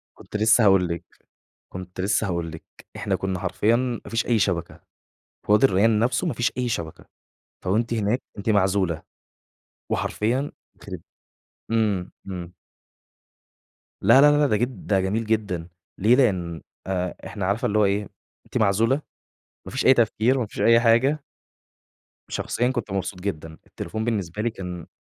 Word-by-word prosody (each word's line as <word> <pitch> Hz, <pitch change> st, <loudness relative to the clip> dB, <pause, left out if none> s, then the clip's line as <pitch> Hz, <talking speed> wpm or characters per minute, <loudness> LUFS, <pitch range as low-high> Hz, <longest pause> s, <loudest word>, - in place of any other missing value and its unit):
كنت -, -, -7 dB
لسه 110 Hz, +2 st, +5 dB
هاقول 95 Hz, -2 st, +5 dB
لِك 85 Hz, 0 st, -4 dB, 0.7 s
كنت 90 Hz, 0 st, -7 dB
لسه 100 Hz, +3 st, +1 dB
هاقول 85 Hz, -3 st, -2 dB
لِك 80 Hz, -, -10 dB, 0.3 s
إحنا -, -, -1 dB
كنا 95 Hz, -2 st, -2 dB
حرفيًا 105 Hz, +4 st, +1 dB
ما 125 Hz, -1 st, -2 dB
فيش 115 Hz, 0 st, 0 dB
أي 115 Hz, -3 st, +2 dB
شبكة، 90 Hz, -4 st, -1 dB, 0.7 s
في -, -, 0 dB
وادي 105 Hz, +6 st, +6 dB
الريان 105 Hz, 0 st, +3 dB
نفسُه 125 Hz, +8 st, +1 dB
ما 160 Hz, -, -1 dB
فيش 120 Hz, -, 0 dB
أي 125 Hz, -1 st, 0 dB
شبكة، 85 Hz, -7 st, -4 dB, 0.6 s
فوأنتِ 115 Hz, +5 st, +1 dB
هناك 110 Hz, +3 st, 0 dB, 0.2 s
أنتِ 100 Hz, +3 st, -1 dB
معزولة 95 Hz, -5 st, +2 dB, 0.9 s
وحرفيًا 125 Hz, +7 st, -1 dB, 0.2 s
يخرب 95 Hz, -4 st, -8 dB, 0.7 s
إمم، 105 Hz, -5 st, +1 dB, 0.2 s
إمم. 90 Hz, -2 st, -7 dB, 1.5 s
لا، 115 Hz, +7 st, +7 dB
لا، 145 Hz, +1 st, +7 dB
لا 145 Hz, -1 st, +4 dB
ده 110 Hz, -, +2 dB
جد 120 Hz, -2 st, -3 dB
ده 100 Hz, -2 st, +3 dB
جميل 105 Hz, +5 st, -1 dB
جدًا، 105 Hz, -6 st, -1 dB, 0.3 s
ليه؟ 110 Hz, +6 st, +4 dB
لإن 90 Hz, -10 st, +1 dB, 0.3 s
أ 90 Hz, -2 st, -2 dB
إحنا 100 Hz, -4 st, -4 dB
عارفة 105 Hz, +6 st, 0 dB
اللي 110 Hz, -3 st, +1 dB
هو 105 Hz, -, +5 dB
إيه، 100 Hz, +1 st, 0 dB, 0.4 s
أنتِ -, -, -4 dB
معزولة، 110 Hz, +7 st, +2 dB, 0.6 s
ما -, -, -8 dB
فيش 130 Hz, -, -2 dB
أي 130 Hz, -, +8 dB
تفكير 120 Hz, +1 st, +2 dB
وما 120 Hz, -4 st, -1 dB
فيش -, -, -6 dB
أي 115 Hz, 0 st, +6 dB
حاجة. 125 Hz, +6 st, +3 dB, 1.1 s
شخصيًا، 120 Hz, -, -1 dB
كنت 120 Hz, -5 st, -4 dB
مبسوط 95 Hz, -1 st, -3 dB
جدًا 80 Hz, -4 st, -5 dB
التليفون 110 Hz, +7 st, -5 dB
بالنسبة 105 Hz, -4 st, -2 dB
لي 120 Hz, -, +1 dB
كان 90 Hz, -6 st, -7 dB
105 Hz, 155 wpm, -24 LUFS, 95-115 Hz, 1.5 s, أي